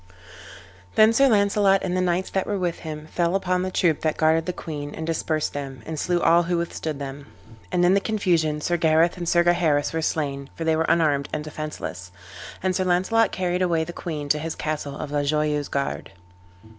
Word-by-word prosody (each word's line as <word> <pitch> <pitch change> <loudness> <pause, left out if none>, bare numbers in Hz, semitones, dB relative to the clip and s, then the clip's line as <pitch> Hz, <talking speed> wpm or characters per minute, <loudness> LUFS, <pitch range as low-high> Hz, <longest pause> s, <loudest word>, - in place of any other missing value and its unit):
Then 215 +1 +6
Sir 275 +4 +5
Launcelot 200 -3 +3
and 180 -1 -1
the 185 - +1
knights 180 +1 0
that 190 - -1
were 205 - -1
with 180 -3 -2
him 155 -1 -7
fell 170 +3 0
upon 185 -1 0
the 185 - -2
troop 170 -4 +1
that 155 -1 0
guarded 160 +1 +2
the - - +1
queen, 145 -4 -6
and 160 - -5
dispersed 160 -1 -1
them, 135 -4 -6
and 160 -1 -5
slew 175 +2 +1
all 170 0 +5
who 175 0 -1
withstood 160 -3 -3
them. 140 0 -7 0.4
And 175 0 +2
in 180 - +5
the 200 - +4
confusion 170 -8 0
Sir 175 +3 0
Gareth 160 +1 +3
and 175 -1 -3
Sir 175 0 +4
Gaheris 170 -5 +2
were 160 - -1
slain, 140 -3 -2
for 165 - -4
they 160 -1 +2
were 160 +1 0
unarmed 145 -4 +2
and 150 - -3
defenceless. 150 -12 -6 0.5
And 185 -1 +1
Sir 185 - +1
Launcelot 190 +6 +2
carried 180 -1 -1
away 170 -3 +2
the 175 +2 -7
queen 150 -5 -5
to 150 - +2
his 160 +1 -4
castle 150 -2 -4
of 145 - -6
La 145 0 +1
Joyeuse 150 0 0
Garde. 140 -6 -3
165 Hz, 205 wpm, -24 LUFS, 150-180 Hz, 0.5 s, Then